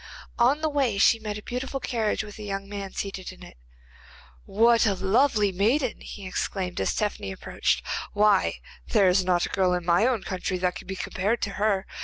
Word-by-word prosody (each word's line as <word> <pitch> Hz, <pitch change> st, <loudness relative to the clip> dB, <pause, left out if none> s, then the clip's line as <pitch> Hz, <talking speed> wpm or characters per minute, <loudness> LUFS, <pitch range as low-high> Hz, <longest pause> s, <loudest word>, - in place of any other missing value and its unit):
On 260 Hz, +6 st, +4 dB
the 315 Hz, -, +1 dB
way 270 Hz, -8 st, 0 dB
she 225 Hz, +3 st, +5 dB
met 210 Hz, -1 st, -4 dB
a 210 Hz, -, -9 dB
beautiful 260 Hz, +2 st, -4 dB
carriage 225 Hz, -5 st, -1 dB
with 210 Hz, 0 st, -11 dB
a -, -, -7 dB
young 195 Hz, -1 st, -4 dB
man 200 Hz, -1 st, -6 dB
seated 195 Hz, -2 st, -5 dB
in -, -, -14 dB
it. -, -, -13 dB, 0.9 s
'What 230 Hz, +2 st, +4 dB
a 200 Hz, -, +2 dB
lovely 210 Hz, +2 st, +2 dB
maiden!' 230 Hz, +8 st, +1 dB
he 200 Hz, -, -9 dB
exclaimed, 185 Hz, 0 st, -3 dB
as -, -, 0 dB
Tephany 205 Hz, -, -2 dB
approached. -, -, -1 dB, 0.3 s
'Why, 205 Hz, -1 st, +3 dB, 0.3 s
there 205 Hz, -4 st, +4 dB
is 185 Hz, +1 st, +3 dB
not 180 Hz, -1 st, +2 dB
a -, -, -6 dB
girl 185 Hz, -2 st, +2 dB
in 175 Hz, -1 st, -4 dB
my 175 Hz, +7 st, +4 dB
own 240 Hz, -6 st, 0 dB
country 185 Hz, 0 st, -3 dB
that 180 Hz, 0 st, 0 dB
can -, -, -10 dB
be 190 Hz, -, -4 dB
compared 205 Hz, +5 st, -1 dB
to 200 Hz, -, -1 dB
her. 200 Hz, -1 st, 0 dB
205 Hz, 200 wpm, -26 LUFS, 190-230 Hz, 0.9 s, she